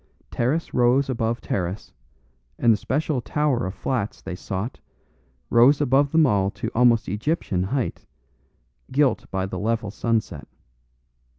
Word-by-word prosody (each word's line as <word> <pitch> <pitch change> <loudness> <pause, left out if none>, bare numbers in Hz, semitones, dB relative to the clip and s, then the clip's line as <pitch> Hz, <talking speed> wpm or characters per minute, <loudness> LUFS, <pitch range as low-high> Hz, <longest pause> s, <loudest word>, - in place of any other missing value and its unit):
Terrace 145 +8 -1
rose 125 +2 +3
above 115 -1 -1
terrace, 90 +2 -4 0.6
and 115 -1 +4
the - - 0
special 140 +3 -1
tower 140 -5 0
of 95 - -6
flats 115 -6 -2
they 95 - -7
sought, 95 +6 -5 0.7
rose 125 +5 +6
above 140 0 +2
them 160 -1 +5
all 100 -6 +2
to - - -5
almost 120 -1 +3
Egyptian 105 - -1
height, 120 +7 -3 0.8
gilt 140 0 +1
by 95 -1 -2
the 95 - -5
level 110 -1 -1
sunset. 110 -8 -2
120 Hz, 130 wpm, -23 LUFS, 100-135 Hz, 0.8 s, rose